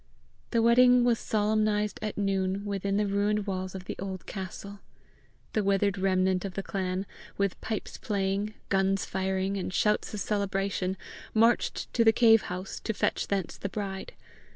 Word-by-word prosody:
The 230 -2 +2
wedding 245 +1 +6
was 240 -2 +3
solemnized 210 0 +1
at 215 -1 -4
noon 195 0 0
within 200 0 -1
the 210 - +2
ruined 205 +1 +1
walls 185 -1 -3
of 190 -1 -7
the - - -5
old 190 -2 -5
castle. 200 +1 -7 0.7
The 215 - +1
withered 200 0 +2
remnant 185 -1 +2
of 195 -2 -5
the 195 - -2
clan, 190 0 -2 0.3
with 200 -2 -1
pipes 220 -2 -4
playing, 205 -1 -1
guns 195 0 +2
firing, 190 +1 -1
and 185 - -3
shouts 210 +3 +1
of - - -4
celebration, 195 -2 -1 0.4
marched 230 +2 +2
to 230 - +4
the 225 - +7
cave 225 -1 +6
house 185 +2 -5
to 220 - -3
fetch - - 0
thence 195 -4 -2
the 200 - -4
bride. 195 -1 -5
200 Hz, 160 wpm, -28 LUFS, 190-210 Hz, 0.7 s, the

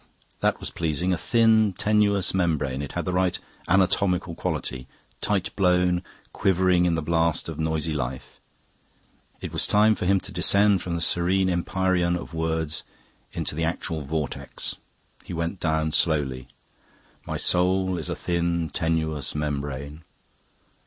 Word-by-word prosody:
That - - +1
was - - -4
pleasing: 85 +3 -1
a - - +2
thin, 110 0 +3
tenuous 105 0 +2
membrane. 75 -7 0
It 70 - -6
had - - -3
the 90 - -2
right 90 -1 +1 0.3
anatomical 90 -1 +2
quality. 65 -5 -4 0.3
Tight 100 -3 -1
blown, 90 -2 +3 0.3
quivering 90 -2 +3
in 85 -2 +2
the 80 - -2
blast 85 0 +1
of - - -6
noisy 80 0 -1
life. 65 -3 -5 1.0
It - - -6
was - - 0
time 105 +1 +5
for 90 - -3
him 100 0 +4
to - - -7
descend 100 -2 +3
from 85 -1 -3
the 85 - -2
serene 95 +2 +3
empyrean 90 0 +1
of 85 - -7
words 80 -1 -2 0.5
into - - -3
the 80 +2 -2
actual 85 0 -2
vortex. 75 +1 -4 0.5
He - - -8
went 85 +3 -3
down 80 -1 0
slowly. 70 -6 0 0.8
"My - - -2
soul 90 0 +2
is 80 - -5
a - - -2
thin, 85 -1 -1
tenuous 80 -3 -1
membrane..." 70 0 -4
85 Hz, 145 wpm, -25 LUFS, 80-95 Hz, 1.0 s, time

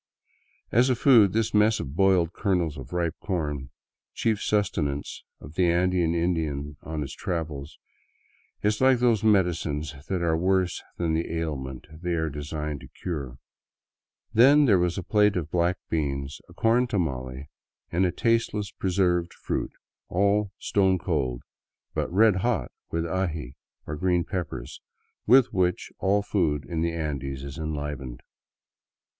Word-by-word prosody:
As 120 +4 +4
a 130 - +3
food, 115 -6 +6
this 110 +1 0
mess 105 +1 +4
of 70 +2 -6
boiled 90 -2 +3
kernels 90 -7 0
of 65 -3 -9
ripe 85 -2 0
corn, 75 -8 -3 0.5
chief 110 -2 0
sustenance 75 -9 -1 0.2
of 75 - -11
the 90 0 +2
Andean 85 -1 +2
Indian 80 -4 -1
on 80 0 -4
his 70 - -7
travels, 75 -4 -4 0.9
is 105 +2 +1
like 130 -1 +5
those 120 -4 +2
medicines 85 -8 +1 0.2
that 90 -3 -1
are 80 -1 +2
worse 90 +1 +1 0.2
than 85 -2 0
the 80 +1 -1
ailment 70 -6 -4 0.2
they 90 -1 -1
are 80 -2 -1
designed 75 0 -4
to - - -12
cure. 70 -8 -5 1.0
Then 140 +6 +7
there 100 -8 +5
was 90 -1 0
a 95 - -3
plate 105 +2 +3
of 80 -4 -3
black 90 +1 +1
beans, 70 -3 -2
a - - -14
corn 120 +2 +3
tamale, 70 - -3 0.4
and 90 +3 +2
a 90 - +2
tasteless 115 -3 0
preserved 90 -2 0
fruit, - - -3 0.4
all 100 +2 +2
stone 95 -2 +2
cold, 70 -9 -2 0.5
but - - -2
red 105 +1 +5
hot 95 - 0 0.2
with 85 0 -1
the 85 - -4
aji, 80 -8 -2 0.3
or 75 - -4
green 90 +1 +1
peppers, 90 -3 -5 0.5
with 125 +2 +6
which 90 -2 0
all 100 +1 +2
food 80 -8 0
in 85 -2 -3
the 85 0 +1
Andes 70 -4 -4
is 70 +1 -7
enlivened. 75 -5 -5
85 Hz, 150 wpm, -26 LUFS, 75-100 Hz, 1.0 s, Then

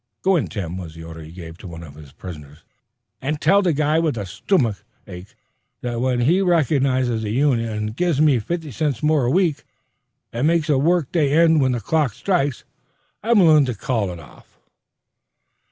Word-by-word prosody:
"Go 190 0 +3
in, 140 - 0
Tim," 85 +1 -5
was 80 -3 -9
the 80 - -10
order 80 0 -9
he 80 0 -11
gave 85 -1 -10
to 100 - -10
one 85 -1 -9
of 75 -4 -11
his 75 -2 -14
prisoners, 75 -3 -11 0.6
"an' 150 +4 -1
tell 200 +6 +3
the 180 -3 +1
guy 150 +1 +1
with 160 -5 0
the 105 -3 -4
stomick 115 - 0 0.3
ache 90 -1 -11 0.5
that 120 -1 -3
when 125 -1 0
he 170 +10 +3
recognizes 135 -9 +1
the 110 - -3
union 120 -1 +1
an' 105 -1 -3
gives 165 +4 0
me 150 -5 +4
fifty 160 +5 -4
cents 145 -1 -2
more 150 -4 +2
a - - +1
week 170 0 +1 0.7
an' 120 +6 0
makes 165 -1 +1
a 145 - +3
work 165 0 +1
day 150 -5 +1
end 160 -1 +4
when 130 -1 +2
the 120 - -2
clock 145 +2 0
strikes, 145 -9 -1 0.6
I'm 230 +2 +2
willin' 155 -4 +6
to 125 -3 -3
call 110 -2 -2
it 85 - -8
off." 75 - -17
130 Hz, 195 wpm, -21 LUFS, 100-155 Hz, 0.7 s, willin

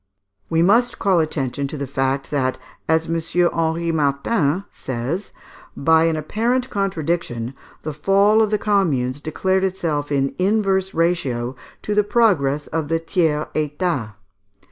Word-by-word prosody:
We 165 0 +2
must 235 +6 +3
call 190 -3 +2
attention 140 -3 -1
to 150 +2 -6
the 140 - -3
fact 135 +1 -1
that, 130 -3 0 0.3
as 160 0 +3
M. 165 0 -1 0.3
Henri 165 +1 0
Martin 150 +4 0
says, 130 - -4 0.5
by 160 +3 +4
an 165 -1 +1
apparent 235 - -1
contradiction, 165 - -2 0.3
the 155 - -4
fall 200 +7 +3
of 215 - +2
the 210 - +1
Communes 145 - 0
declared 190 +5 0
itself 160 -6 -1
in 135 -1 +1
inverse 195 -1 +1
ratio 135 -8 0 0.3
to 210 - -1
the 210 0 +3
progress 165 - +2
of 160 -1 -3
the 165 +2 0
Tiers 160 -3 0
Etat. 150 - -2
160 Hz, 140 wpm, -21 LUFS, 140-190 Hz, 0.5 s, by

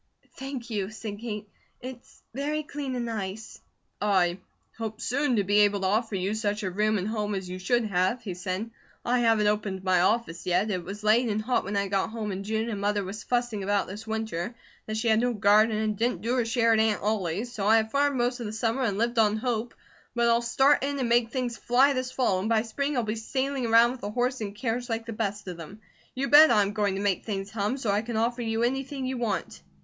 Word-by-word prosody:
"Thank 265 -3 -6
you," 200 -3 -2
said 215 -1 -7
Kate. 210 -2 -5 0.3
"It's 250 -1 -11
very 295 +4 -2
clean 285 -3 -5
and 240 -1 -2
nice." 220 -1 -5 0.4
"I 185 -3 +2 0.4
hope 220 -1 -5
soon 275 +1 0
to 205 - +2
be 205 +2 +3
able 205 -1 +3
to - - -1
offer 215 +2 +1
you 190 +2 -1
such 210 -1 -1
a 190 - -2
room 215 +3 +1
and 190 +1 -2
home 210 -2 -2
as 190 -1 -4
you 185 +1 -6
should 240 +5 +1
have," 195 +4 0
he 195 -5 -4
said. 185 +5 -4 0.3
"I 250 +1 +2
haven't 225 -3 +3
opened 205 -2 -1
my 185 -2 +3
office 185 -3 0
yet. 185 +4 +2
It 180 -3 -2
was 200 +4 -8
late 225 +3 +4
and 210 0 0
hot 235 0 0
when 200 +1 -2
I 200 0 0
got 195 0 0
home 220 -2 -4
in 190 +1 -4
June 220 +2 -1
and 205 -3 -4
Mother 205 0 0
was 200 +3 -6
fussing 240 -4 -1
about 200 0 +1
this 210 +4 -9
winter 220 -2 -3 0.3
that 215 0 -3
she 225 +2 -1
had 220 -1 +4
no 245 0 +1
garden 215 +1 +4
and 215 -1 0
didn't 225 -3 -1
do 235 +2 0
her 245 -2 +1
share 230 0 +3
at 220 - +3
Aunt 220 -3 +1
Ollie's, 210 +1 -1
so 205 -4 -2
I 220 +1 +6
have 220 0 0
farmed 285 -1 +2
most 245 +1 0
of 235 - -4
the 210 - -5
summer, 225 +3 -1
and 205 -6 0
lived 235 +1 0
on 215 -1 +4
hope; 235 0 -2 0.4
but 235 0 +2
I'll 235 0 +4
start 270 +4 +3
in 280 0 -1
and 255 -3 -1
make 235 -1 +3
things 245 -2 -3
fly 260 +6 +3
this 255 -1 -2
fall, 240 -8 +1
and 205 +4 -2
by 220 -1 +3
spring 280 +5 -2
I'll 245 - +2
be 215 -1 -2
sailing 260 +3 -2
around 230 +1 +6
with 255 - -8
a 205 - -4
horse 250 +3 -1
and 200 -1 -4
carriage 245 +2 -2
like 225 0 -2
the 230 - -5
best 205 -2 -3
of 180 -2 -5
them. 170 +6 -10 0.4
You 270 +2 -1
bet 305 +2 +9
I 210 -3 +5
am 200 +1 -3
going 205 -2 0
to 195 - -3
make 200 -2 0
things 195 -2 -4
hum, 215 +4 -1
so 235 -6 -1
I 205 +1 +2
can 230 0 -4
offer 240 +2 0
you 225 0 -1
anything 270 +2 -2
you 255 -1 -3
want." 195 - -3
220 Hz, 245 wpm, -27 LUFS, 205-240 Hz, 0.4 s, bet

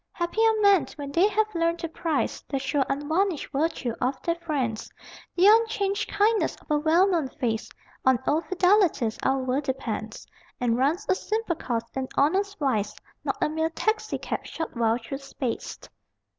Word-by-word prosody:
Happy 345 +5 -1
are 445 -1 +3
men 395 -9 +5
when 285 -2 -6
they 345 +7 +4
have 430 +1 0
learned 335 0 +1
to 335 - -4
prize 320 -2 -2
The 275 - -1
sure 270 +1 0
unvarnished 315 +5 0
virtue 280 -4 -1
of 260 +1 0
their 335 - +1
friends, 290 -10 -3 0.4
The 360 - +4
unchanged 430 -1 +3
kindness 425 +2 +2
of - - -11
a 300 - +3
well 325 +5 +4
known 335 -7 +1
face: 235 -4 -3 0.3
On 260 -1 +5
old 310 +2 +1
fidelities 360 - +2
our 265 0 +2
world 260 +2 -1
depends, 230 -5 -4 0.3
And 240 -2 +1
runs 290 - +1
a - - +4
simple 430 -1 -2
course 235 -7 -3
in 265 -1 -3
honest 390 +7 +2
wise, 220 -8 0 0.3
Not - - -2
a - - +3
mere 320 +1 0
taxicab 435 +6 -2
shot 325 -4 -6
wild 230 0 +1
through 275 +3 -5
space! 270 -3 -4
315 Hz, 170 wpm, -26 LUFS, 265-385 Hz, 0.4 s, men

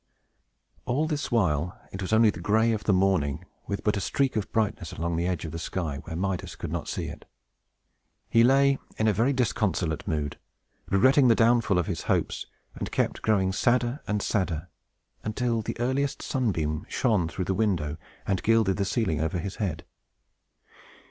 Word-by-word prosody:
All 130 +5 +1
this 150 -3 -2
while, 90 -7 +1
it 95 - -6
was 95 - -3
only 110 -1 +5
the 85 - -9
gray 110 +6 +3
of 105 -2 -2
the - - +3
morning, 95 -7 +1 0.2
with 100 - -3
but 105 - +2
a 100 - -1
streak 135 +6 0
of 105 -3 -2
brightness 110 -2 -1
along 85 +1 -2
the 85 +2 0
edge 90 -2 -2
of 80 - -5
the 85 - -5
sky, 80 -4 -3
where 80 - -6
Midas 95 0 -2
could - - -6
not - - -3
see - - -3
it. - - -8 1.0
He 115 - +4
lay 135 +2 +4 0.2
in 110 - +2
a 110 - +4
very 115 +8 +2
disconsolate 105 - 0
mood, 75 -5 -2 0.5
regretting 130 +8 +5
the 115 - +6
downfall 115 -4 +3
of 90 - +1
his - - -3
hopes, - - -1 0.3
and - - -5
kept - - 0
growing 95 -4 +2
sadder 120 +4 +1
and 105 -1 0
sadder, 90 -4 -1 0.5
until 115 +1 0
the 110 - -5
earliest 135 +3 0
sunbeam 80 - -1
shone 105 -9 +1
through 90 +2 -4
the 95 - 0
window, 90 -8 0 0.3
and 95 -3 0
gilded 110 -4 +3
the 100 - 0
ceiling 95 - 0
over 80 +2 -1
his 95 +3 -5
head. 85 -8 -3
100 Hz, 180 wpm, -27 LUFS, 90-115 Hz, 1.0 s, the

